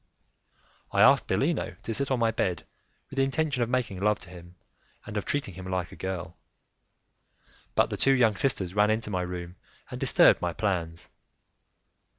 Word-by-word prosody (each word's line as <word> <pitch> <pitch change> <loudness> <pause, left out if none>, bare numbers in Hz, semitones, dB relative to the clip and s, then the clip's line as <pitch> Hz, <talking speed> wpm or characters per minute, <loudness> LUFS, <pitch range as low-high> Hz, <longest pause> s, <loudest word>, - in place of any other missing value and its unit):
I - - +4
asked - - +5
Bellino - - 0
to 115 - -3
sit 140 +3 -1
on 130 - +1
my 115 -1 +2
bed 95 -6 -2 0.5
with 135 - -9
the 135 - +4
intention 140 -1 0
of 120 - 0
making 120 -7 -1
love 105 +1 +2
to 90 - -12
him, 90 0 -13 0.5
and 110 - -8
of 105 - -2
treating 140 -9 -2
him 95 +1 -9
like 90 -1 -2
a - - -10
girl, 90 -2 -5 1.4
but - - +3
the - - -2
two 135 - +3
young 115 -5 +3
sisters 95 -7 0
ran 105 +1 +3
into 110 -1 -1
my 90 -2 -1
room 90 0 -6 0.3
and - - -6
disturbed - - +5
my 85 -1 -1
plans. 85 -4 -2
100 Hz, 175 wpm, -27 LUFS, 90-120 Hz, 1.4 s, asked